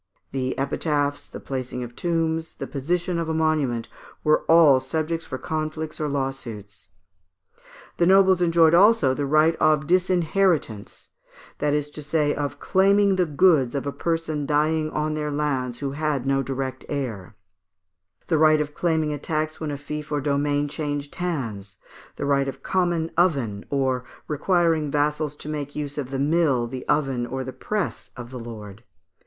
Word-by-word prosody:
The 130 -1 -2
epitaphs, 145 +1 -1
the - - -8
placing 130 -2 -4
of 120 0 -9
tombs, 165 -1 -1
the - - -5
position 170 +5 -2
of 165 -1 -2
a 160 - -1
monument, 150 -7 0 0.4
were 155 0 +3
all 160 -5 +6
subjects 160 +5 -3
for 130 - -4
conflicts 155 +1 -4
or 150 - 0
lawsuits. 115 -9 -5 1.1
The 170 - +3
nobles 190 -1 +5
enjoyed 165 -2 +4
also 195 -6 +5
the 140 +1 -2
right 155 +3 +4
of 155 -1 +3
disinheritance, 175 - 0 0.5
that 145 0 +1
is 150 0 -2
to 150 - -8
say, 150 0 +1
of 145 -1 -4
claiming 195 +1 +3
the 180 -2 +1
goods 145 -4 +3
of 140 - -2
a 140 - -1
person 160 -2 -2
dying 155 +1 +1
on 155 0 -1
their 150 -1 -2
lands 135 -4 -1
who 140 -1 -2
had 145 -2 -1
no 135 0 +2
direct 130 0 -4
heir; 115 -9 -4 0.9
the 160 -3 +1
right 155 0 +5
of 150 -1 -2
claiming 160 -2 0
a 145 - -5
tax 155 +1 -2
when 155 - -2
a 145 - -3
fief 150 +1 -6
or 145 - +1
domain 145 +1 0
changed 145 -1 -4
hands; 115 - -4 0.4
the - - -4
right 140 -1 +2
of 135 - -6
common 175 -3 0
oven, 135 - +1
or 130 -2 0 0.2
requiring 160 0 +1
vassals 150 +1 0
to 145 - -8
make 145 -2 -4
use 145 -1 -4
of 130 -3 -4
the 135 - -3
mill, 145 -3 +2
the 125 +2 -7
oven, 135 -5 0
or 130 +2 -4
the 130 0 -7
press 210 -3 -3
of 120 0 -8
the 130 - -6
lord. 110 -2 -9
150 Hz, 165 wpm, -24 LUFS, 135-160 Hz, 1.1 s, all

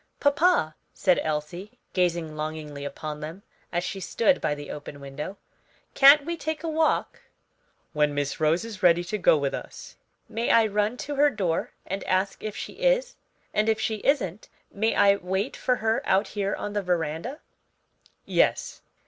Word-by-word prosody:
"Papa," 285 - +3 0.2
said 185 -3 +3
Elsie, 155 +9 -4 0.2
gazing 170 -4 0
longingly 155 -2 -5
upon 150 +1 -5
them, 160 +6 -8 0.3
as 175 0 -1
she 195 +2 -4
stood 235 +8 +1
by 150 - 0
the 145 0 -8
open 145 -1 -8
window, 140 +7 -7 0.6
"can't 280 +1 +8
we 340 +1 -2
take 315 0 -4
a - - -2
walk?" 320 0 0 0.7
"When 150 -1 +1
Miss 145 -1 -2
Rose 160 +6 +2
is 215 -5 -8
ready 175 -1 +5
to 210 +4 -3
go 165 - +5
with 140 -2 -1
us." - - -8 0.3
"May 230 +1 -2
I 230 -1 +6
run 210 +3 0
to 290 0 -4
her 295 +1 +5
door 185 - -1 0.2
and 195 +1 -4
ask 190 +1 0
if 215 -1 -4
she - - -6
is? - - +1 0.4
and 215 +1 +2
if 220 -1 +2
she 220 0 -1
isn't, 215 - 0 0.2
may 220 +3 0
I 200 0 +5
wait 190 +6 -2
for 250 - +1
her 220 -1 0
out 195 +2 +2
here 200 -1 -2
on 205 - -5
the 205 - 0
veranda?" 175 - -2 0.9
"Yes." - - +1
195 Hz, 170 wpm, -26 LUFS, 155-230 Hz, 0.9 s, can't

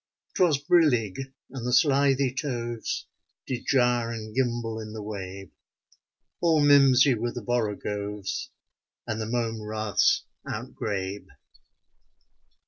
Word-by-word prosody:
'Twas 170 -6 +3
brillig, 135 - +2 0.2
and 130 -3 -6
the 125 - -1
slithy 135 -1 +3
toves 120 -5 -3 0.4
Did 125 -2 -5
gyre 120 -3 +3
and 110 -2 -6
gimble 120 -3 -1
in 110 -1 -7
the 110 -1 -6
wabe; 95 -2 -7 0.9
All 165 -2 +4
mimsy 140 -2 +6
were 120 +1 -2
the 120 - -6
borogoves 105 -3 -2 0.6
And 110 0 -3
the 110 - -3
mome 115 -2 -1
raths 110 -2 +1 0.2
outgrabe. 100 -1 -4
120 Hz, 110 wpm, -26 LUFS, 110-135 Hz, 0.9 s, mimsy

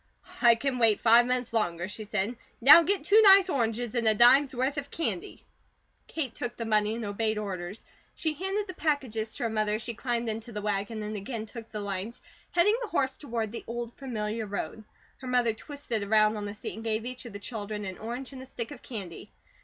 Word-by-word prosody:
"I 235 -1 +7
can 255 +2 -2
wait 225 -3 +4
five 235 +1 +6
minutes 250 -2 -1
longer," 175 -6 0
she 215 +2 -6
said. 210 +3 -2 0.2
"Now 285 +7 +10
get 385 0 +1
two 415 +7 +6
nice 390 -2 +7
oranges 235 -2 -1
and 235 -2 0
a 215 - +4
dime's 260 +4 +6
worth 260 +4 0
of 285 0 -4
candy." 330 - -4 0.6
Kate 290 -7 -3
took 240 -1 -5
the 230 - -4
money 215 0 +1
and 230 -1 -4
obeyed 215 +2 -1
orders. 195 -1 -5 0.3
She 315 -1 -1
handed 385 +6 -2
the 370 - -6
packages 255 -9 -1
to - - -4
her 230 - +1
mother 215 -1 +1
as 220 - -4
she 235 - -4
climbed 240 0 -2
into 225 +1 -4
the 210 - -4
wagon 210 +1 -2
and 210 +1 -4
again 215 +2 -5
took 225 +1 -10
the 210 - -4
lines, 200 +3 -4 0.3
heading 415 +7 +3
the 480 - -3
horse 265 -4 0
toward 230 -6 -3
the 235 - -6
old, 235 0 -5
familiar 220 -4 -4
road. 205 +2 -5 0.3
Her 260 - -8
mother 245 -2 +2
twisted 245 -2 -4
around 215 +1 +3
on 210 -1 -4
the 205 - -6
seat - - -6
and 225 - -8
gave 220 0 -1
each 255 +1 -5
of 235 - -9
the - - -5
children 210 0 -5
an 190 -1 -6
orange 245 +4 -6
and 260 - -8
a 260 - -10
stick 235 -1 -4
of 290 - -9
candy. 195 - -8
230 Hz, 220 wpm, -28 LUFS, 215-260 Hz, 0.6 s, Now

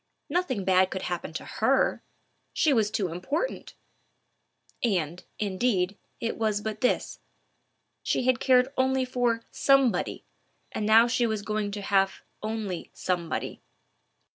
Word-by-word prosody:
Nothing 280 - -1
bad 185 0 +4
could 190 - -4
happen 175 -3 -3
to - - -5
her—she 305 -3 0
was 220 -4 +2
so 190 -5 -1
important! 275 - -3 1.1
And, 180 -7 0
indeed, 195 -2 0 0.2
it 230 - -2
was 215 -2 +1
but 215 0 -5
this: 250 - 0 0.8
she - - 0
had 255 -1 +2
cared 255 +1 +4
only 260 0 +2
for 245 -2 0
Somebody, 275 -4 +2 0.5
and 210 - -2
now 225 +2 +7
she 240 0 +1
was 215 -2 -2
going 215 -1 -1
to 205 -1 -5
have 195 -1 +1 0.2
only 215 -5 -4
Somebody. 175 -3 -2
220 Hz, 125 wpm, -27 LUFS, 190-250 Hz, 1.1 s, now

